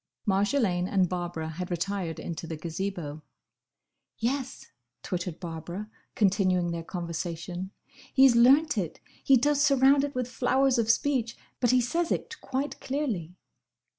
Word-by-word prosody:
Marjolaine 200 Hz, -2 st, +1 dB
and 190 Hz, -2 st, +2 dB
Barbara 175 Hz, -3 st, -3 dB
had 175 Hz, +3 st, -5 dB
retired 175 Hz, -1 st, -2 dB
into 170 Hz, 0 st, -5 dB
the 165 Hz, -, -4 dB
Gazebo. 165 Hz, -2 st, -4 dB, 1.0 s
"Yes!" 260 Hz, +3 st, -2 dB, 0.4 s
twittered 180 Hz, -2 st, -4 dB
Barbara, 175 Hz, +5 st, -6 dB, 0.2 s
continuing 185 Hz, -4 st, +2 dB
their 170 Hz, 0 st, -3 dB
conversation, 175 Hz, +1 st, -5 dB, 0.4 s
"he's 265 Hz, -2 st, +6 dB
learnt 270 Hz, +2 st, +5 dB
it! 170 Hz, -4 st, -4 dB, 0.2 s
He 270 Hz, -, +6 dB
does 290 Hz, +3 st, +2 dB
surround 275 Hz, -1 st, +5 dB
it 285 Hz, -1 st, -3 dB
with 250 Hz, -1 st, -1 dB
flowers 260 Hz, +1 st, +2 dB
of 225 Hz, -1 st, 0 dB
speech, 235 Hz, -1 st, +1 dB, 0.2 s
but 245 Hz, -, +2 dB
he 255 Hz, 0 st, +4 dB
says 330 Hz, +8 st, -1 dB
it 460 Hz, -, -3 dB
quite 275 Hz, +2 st, -3 dB
clearly." 225 Hz, -, -3 dB
200 Hz, 135 wpm, -28 LUFS, 175-260 Hz, 1.0 s, he's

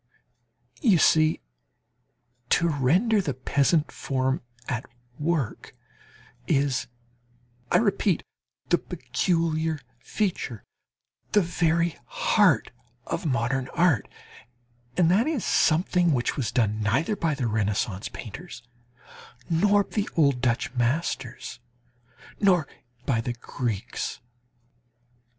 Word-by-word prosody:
You 195 Hz, -5 st, +5 dB
see, 155 Hz, 0 st, +4 dB, 1.1 s
to 170 Hz, -, +3 dB
render 175 Hz, -, +2 dB
"the 140 Hz, -8 st, -3 dB
peasant 140 Hz, +4 st, +1 dB
form 130 Hz, 0 st, -1 dB, 0.3 s
at 120 Hz, -1 st, -2 dB, 0.4 s
work" 155 Hz, -2 st, -2 dB, 0.7 s
is, 140 Hz, -3 st, +1 dB, 0.8 s
I -, -, +6 dB
repeat, 200 Hz, -4 st, +1 dB, 0.5 s
the -, -, +4 dB
peculiar 160 Hz, -3 st, -1 dB, 0.2 s
feature, 170 Hz, -, -3 dB, 0.7 s
the 210 Hz, -, +6 dB
very 170 Hz, 0 st, +1 dB
heart -, -, +2 dB, 0.3 s
of 175 Hz, -, -3 dB
modern 130 Hz, 0 st, 0 dB
art, 170 Hz, -, +3 dB, 0.9 s
and 170 Hz, -2 st, +4 dB
that 215 Hz, +8 st, +3 dB
is 310 Hz, -8 st, -1 dB
something 175 Hz, +1 st, +3 dB
which 125 Hz, -2 st, 0 dB
was 125 Hz, -4 st, -2 dB
done 110 Hz, -3 st, +1 dB
neither 135 Hz, -, +1 dB
by 165 Hz, -6 st, 0 dB
the 135 Hz, -3 st, -2 dB
Renaissance 105 Hz, -2 st, -1 dB
painters, 125 Hz, -, -9 dB, 0.9 s
nor 205 Hz, +5 st, +4 dB
the 210 Hz, +1 st, -3 dB
old 140 Hz, -6 st, +3 dB
Dutch 120 Hz, -1 st, 0 dB
masters, 125 Hz, -1 st, -2 dB, 0.8 s
nor 180 Hz, -7 st, +3 dB, 0.4 s
by 115 Hz, -4 st, +1 dB
the 120 Hz, +1 st, -3 dB
Greeks. 120 Hz, -3 st, -4 dB
150 Hz, 100 wpm, -26 LUFS, 125-175 Hz, 1.1 s, I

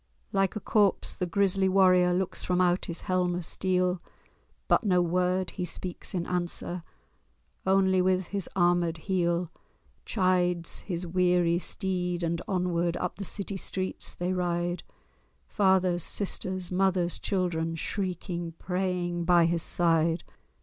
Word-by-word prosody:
Like 195 Hz, +1 st, +1 dB
a -, -, -2 dB
corpse 205 Hz, -2 st, +2 dB
the 180 Hz, -, -2 dB
grisly 195 Hz, 0 st, +2 dB
warrior 185 Hz, -2 st, +5 dB
Looks 185 Hz, +1 st, -1 dB
from 180 Hz, 0 st, 0 dB
out 180 Hz, 0 st, +2 dB
his 170 Hz, -, -6 dB
helm 180 Hz, -1 st, 0 dB
of 175 Hz, -1 st, -4 dB
steel; 180 Hz, 0 st, 0 dB, 0.7 s
But -, -, +3 dB
no 185 Hz, -4 st, +3 dB
word 180 Hz, +1 st, +1 dB
he 185 Hz, -, -4 dB
speaks 180 Hz, +2 st, -5 dB
in 170 Hz, -1 st, -1 dB
answer— 175 Hz, 0 st, -3 dB, 0.9 s
Only 190 Hz, -1 st, +4 dB
with 185 Hz, -1 st, +1 dB
his 200 Hz, -2 st, -3 dB
armèd 175 Hz, -2 st, +2 dB
heel 175 Hz, -1 st, 0 dB, 0.5 s
Chides 180 Hz, -4 st, +1 dB
his 180 Hz, -2 st, -4 dB
weary 175 Hz, -1 st, +2 dB
steed, 180 Hz, -2 st, -2 dB
and 170 Hz, 0 st, -1 dB
onward 175 Hz, -2 st, 0 dB
Up 180 Hz, -, -3 dB
the 200 Hz, -, -5 dB
city 200 Hz, +1 st, -3 dB
streets 185 Hz, 0 st, -3 dB
they 180 Hz, +1 st, -1 dB
ride; 175 Hz, -1 st, -1 dB, 0.6 s
Fathers, 190 Hz, -3 st, +2 dB
sisters, 185 Hz, -2 st, -1 dB
mothers, 180 Hz, -2 st, +1 dB
children, 165 Hz, -4 st, -1 dB
Shrieking, 175 Hz, -1 st, -3 dB
praying 180 Hz, -2 st, -2 dB
by 175 Hz, -1 st, +5 dB
his 170 Hz, 0 st, +1 dB
side. 165 Hz, 0 st, +2 dB
180 Hz, 135 wpm, -28 LUFS, 175-185 Hz, 0.9 s, warrior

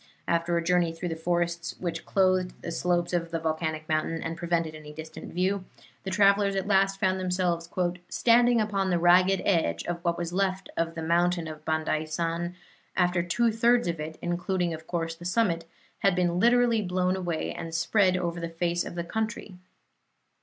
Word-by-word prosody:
After 170 Hz, 0 st, +1 dB
a 170 Hz, -, 0 dB
journey 175 Hz, -1 st, +2 dB
through 175 Hz, +2 st, -4 dB
the 165 Hz, -, -3 dB
forests 170 Hz, 0 st, -1 dB
which 170 Hz, -2 st, -4 dB
clothed 185 Hz, -1 st, +1 dB
the 170 Hz, -, -4 dB
slopes 175 Hz, +1 st, 0 dB
of 170 Hz, -1 st, 0 dB
the 165 Hz, -, -2 dB
volcanic 160 Hz, -1 st, -2 dB
mountain 160 Hz, +1 st, -1 dB
and 165 Hz, 0 st, -3 dB
prevented 170 Hz, -2 st, -1 dB
any 155 Hz, -1 st, -10 dB
distant 160 Hz, +1 st, -9 dB
view, 185 Hz, +2 st, 0 dB, 0.4 s
the 190 Hz, -, -5 dB
travelers 200 Hz, +1 st, +3 dB
at 190 Hz, -1 st, -1 dB
last 195 Hz, -1 st, +2 dB
found 190 Hz, -2 st, +1 dB
themselves 180 Hz, -2 st, -1 dB, 0.4 s
"standing 240 Hz, 0 st, +4 dB
upon 200 Hz, -3 st, 0 dB
the 175 Hz, -, +2 dB
ragged 180 Hz, +2 st, +4 dB
edge 85 Hz, -, +1 dB
of 170 Hz, 0 st, -4 dB
what 170 Hz, -1 st, 0 dB
was 175 Hz, 0 st, -4 dB
left 190 Hz, 0 st, -1 dB
of 165 Hz, 0 st, -1 dB
the 165 Hz, -, -4 dB
mountain 170 Hz, 0 st, +1 dB
of 155 Hz, -1 st, -8 dB
Bandaisan, 160 Hz, +2 st, -1 dB, 0.4 s
after 180 Hz, -1 st, +3 dB
two 225 Hz, +7 st, +1 dB
thirds 235 Hz, 0 st, +3 dB
of 170 Hz, -2 st, -2 dB
it, 155 Hz, +1 st, -6 dB
including, 175 Hz, 0 st, -1 dB
of 160 Hz, 0 st, -9 dB
course, 165 Hz, -2 st, -2 dB
the 165 Hz, -, -13 dB
summit, 175 Hz, -3 st, +1 dB, 0.3 s
had 195 Hz, -2 st, +3 dB
been 175 Hz, -1 st, +1 dB
literally 240 Hz, 0 st, +4 dB
blown 185 Hz, -1 st, 0 dB
away 175 Hz, -4 st, -2 dB
and 165 Hz, 0 st, -6 dB
spread 185 Hz, +1 st, +3 dB
over 170 Hz, -1 st, -2 dB
the 170 Hz, 0 st, -4 dB
face 170 Hz, +1 st, -1 dB
of -, -, -7 dB
the 170 Hz, -, -2 dB
country. 215 Hz, +1 st, -4 dB
175 Hz, 180 wpm, -27 LUFS, 165-190 Hz, 0.4 s, standing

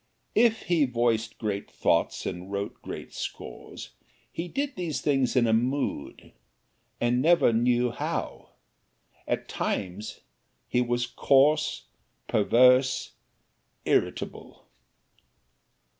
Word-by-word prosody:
If 225 Hz, 0 st, +3 dB
he 170 Hz, -5 st, +2 dB
voiced 115 Hz, -3 st, 0 dB
great 105 Hz, -2 st, -3 dB
thoughts -, -, 0 dB
and 90 Hz, +2 st, -5 dB
wrote 100 Hz, 0 st, -4 dB
great -, -, -8 dB
scores, -, -, -7 dB, 0.4 s
he 170 Hz, -, -4 dB
did 280 Hz, +7 st, -3 dB
these 170 Hz, -5 st, -3 dB
things 135 Hz, -4 st, +1 dB
in 125 Hz, -2 st, +4 dB
a 110 Hz, -, +2 dB
mood 125 Hz, -, -2 dB, 0.7 s
and 120 Hz, +1 st, +1 dB
never 165 Hz, -5 st, +4 dB
knew 120 Hz, +1 st, +2 dB
how. -, -, -4 dB, 0.8 s
At -, -, -2 dB
times 100 Hz, +3 st, -4 dB, 0.5 s
he 125 Hz, -, +1 dB
was 120 Hz, 0 st, 0 dB
coarse, 140 Hz, +5 st, +2 dB, 0.4 s
perverse, 125 Hz, +4 st, +4 dB, 0.7 s
irritable. -, -, -2 dB
125 Hz, 100 wpm, -27 LUFS, 115-145 Hz, 0.8 s, in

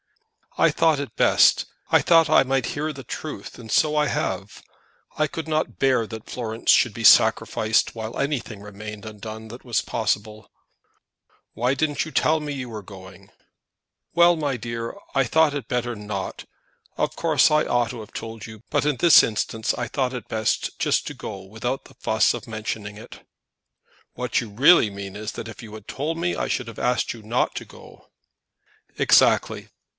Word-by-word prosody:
"I -, -, +5 dB
thought 160 Hz, -3 st, +2 dB
it 140 Hz, -, -6 dB
best. -, -, +4 dB, 0.3 s
I -, -, +6 dB
thought 165 Hz, -2 st, +5 dB
that -, -, +1 dB
I -, -, +7 dB
might 135 Hz, -1 st, 0 dB
hear 155 Hz, +2 st, -2 dB
the 135 Hz, -4 st, -10 dB
truth, -, -, -7 dB
and 110 Hz, -2 st, -9 dB
so 150 Hz, -1 st, +3 dB
I 150 Hz, -1 st, +2 dB
have. -, -, -3 dB, 0.6 s
I 155 Hz, -, +2 dB
could 160 Hz, +1 st, -6 dB
not 155 Hz, 0 st, -1 dB
bear 130 Hz, -4 st, +2 dB
that 110 Hz, 0 st, -9 dB
Florence 115 Hz, -2 st, 0 dB
should -, -, +4 dB
be -, -, -4 dB
sacrificed 110 Hz, +1 st, +4 dB
whilst 110 Hz, 0 st, -5 dB
anything 135 Hz, -7 st, -2 dB
remained 105 Hz, +1 st, -9 dB
undone 110 Hz, +1 st, -8 dB
that 120 Hz, +3 st, -10 dB
was 120 Hz, -3 st, 0 dB
possible." 110 Hz, -1 st, -3 dB, 1.0 s
"Why 125 Hz, +3 st, 0 dB
didn't 145 Hz, 0 st, 0 dB
you 155 Hz, -, -8 dB
tell 155 Hz, +3 st, +2 dB
me 150 Hz, -1 st, -4 dB
that 140 Hz, -, -5 dB
you 125 Hz, -2 st, -5 dB
were 110 Hz, -2 st, -6 dB
going?" 95 Hz, 0 st, -13 dB, 0.8 s
"Well, 170 Hz, 0 st, +5 dB
my 145 Hz, -5 st, -2 dB
dear; 115 Hz, -, -5 dB, 0.2 s
I 135 Hz, -, +4 dB
thought 155 Hz, +4 st, +3 dB
it 140 Hz, -6 st, -5 dB
better 120 Hz, -1 st, -1 dB
not. 105 Hz, -2 st, -5 dB, 0.5 s
Of -, -, -1 dB
course 160 Hz, -4 st, +3 dB
I 150 Hz, 0 st, +4 dB
ought 120 Hz, -1 st, +1 dB
to 120 Hz, -3 st, -7 dB
have 105 Hz, -, -12 dB
told 115 Hz, -2 st, -7 dB
you, 110 Hz, 0 st, -12 dB
but -, -, +1 dB
in 150 Hz, -3 st, +1 dB
this 170 Hz, +2 st, +8 dB
instance 110 Hz, 0 st, -1 dB
I 120 Hz, -, -3 dB
thought 130 Hz, +1 st, -1 dB
it 125 Hz, -, -6 dB
best 110 Hz, -1 st, -1 dB
just -, -, +1 dB
to -, -, -5 dB
go 95 Hz, -1 st, -8 dB
without 110 Hz, +6 st, -4 dB
the -, -, -16 dB
fuss 110 Hz, -1 st, +2 dB
of -, -, -7 dB
mentioning 110 Hz, -2 st, -5 dB
it." 115 Hz, +3 st, -13 dB, 0.9 s
"What -, -, -1 dB
you 115 Hz, -, -7 dB
really 125 Hz, +3 st, +5 dB
mean 100 Hz, -1 st, -8 dB
is, 110 Hz, +1 st, -5 dB
that 115 Hz, -, -7 dB
if 110 Hz, -, -10 dB
you 105 Hz, -1 st, -11 dB
had 110 Hz, -2 st, -12 dB
told 155 Hz, +4 st, -3 dB
me 175 Hz, +1 st, -1 dB
I -, -, -2 dB
should 125 Hz, -, -2 dB
have 115 Hz, -, -9 dB
asked 125 Hz, 0 st, 0 dB
you 115 Hz, -, -12 dB
not 115 Hz, +4 st, -1 dB
to -, -, -5 dB
go." -, -, -16 dB, 0.9 s
"Exactly." -, -, +3 dB
120 Hz, 190 wpm, -23 LUFS, 110-145 Hz, 1.0 s, this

